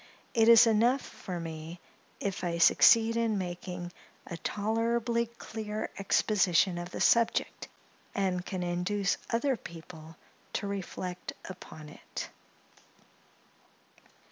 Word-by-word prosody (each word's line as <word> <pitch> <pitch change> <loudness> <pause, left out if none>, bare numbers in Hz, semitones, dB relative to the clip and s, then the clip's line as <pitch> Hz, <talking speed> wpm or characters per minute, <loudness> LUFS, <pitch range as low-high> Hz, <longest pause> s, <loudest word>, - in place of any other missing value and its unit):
It 225 0 +4
is 230 0 +9
enough 235 +4 +3
for 180 -2 -7
me, 165 +1 -7 0.4
if 195 -2 -3
I 170 -1 -1
succeed 230 +6 +6
in 230 -2 +1
making 180 -1 -5 0.3
a 170 - -6
tolerably 230 +4 0
clear 220 -2 -6
exposition 190 -3 +2
of 175 +1 -6
the - - -7
subject, 230 -1 +2 0.5
and 185 -2 0
can 185 -1 -4
induce 180 +3 0
other 255 +4 +1
people 165 -4 -11 0.4
to - - -2
reflect 185 -2 -5
upon 170 -4 -10
it. - - -8
195 Hz, 110 wpm, -30 LUFS, 175-225 Hz, 0.5 s, is